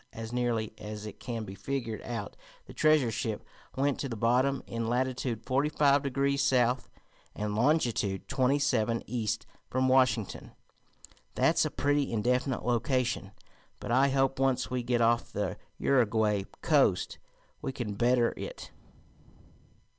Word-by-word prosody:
As 115 +1 -7
nearly 120 -3 -1
as 105 0 -7
it 105 -1 -9
can 115 -2 -4
be 95 -2 -8
figured 115 -1 -4
out 115 -4 -5 0.3
the - - -12
treasure 155 -6 +3
ship 110 0 -3 0.3
went 140 0 +1
to 135 - -3
the 115 - -4
bottom 125 +5 +2
in 115 -1 -3
latitude 125 -2 -1
forty 140 +3 +1
five 145 -2 +3
degrees 140 0 0
south, 125 -2 +2 0.5
and 105 0 -2
longitude 120 -6 +1
twenty 135 0 +2
seven 115 -5 +1
east 115 -1 -2 0.2
from 130 +1 +1
Washington. 130 -5 +1 0.8
That's - - +3
a - - 0
pretty 145 0 0
indefinite 125 +3 0
location, 120 -2 0 0.5
but - - -5
I 135 +3 +4
hope, 135 0 +1
once 130 -1 +1
we 125 -1 0
get 120 0 0
off 115 +1 +2
the 100 -2 -2 0.2
Uruguay 110 -6 +2 0.2
coast, - - +2 0.4
we - - -3
can 120 -6 -4
better 120 +2 +2
it. - - -7
125 Hz, 140 wpm, -30 LUFS, 115-135 Hz, 0.8 s, I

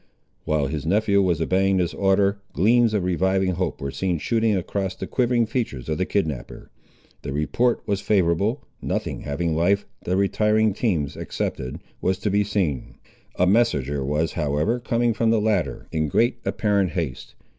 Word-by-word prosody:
While 75 -2 +1
his 70 +1 -3
nephew 100 +3 +2
was 90 -4 +1
obeying 95 +3 +2
this 90 -2 0
order, 100 +1 +2
gleams 115 +5 +3
of 100 - 0
reviving 95 +1 +1
hope 90 +1 -2
were 70 0 -4
seen 90 +1 -1
shooting 110 +5 +1
across 95 0 -2
the - - -5
quivering 120 -2 +1
features 110 - -3
of 75 - -1
the 95 - 0
kidnapper. 80 -11 -3 0.5
The 70 - -5
report 115 - 0
was 100 -1 -1
favourable, 100 - +1 0.2
nothing - - -3
having 80 +3 -2
life, 100 +5 +2 0.2
the 90 +1 0
retiring 105 +2 +2
teams 90 - -1
excepted, 65 -1 -4 0.2
was 95 0 +1
to 105 0 -2
be 105 +1 +3
seen. 85 - -2 0.4
A 90 - +3
messenger 75 - +2
was, 75 +4 0
however, 75 +11 0
coming 120 0 +1
from 115 +1 +1
the 115 -1 +3
latter, 100 - -1
in 80 -1 0
great 120 - +1
apparent 100 -6 +1
haste. 80 -8 -4
95 Hz, 165 wpm, -23 LUFS, 80-105 Hz, 0.5 s, gleams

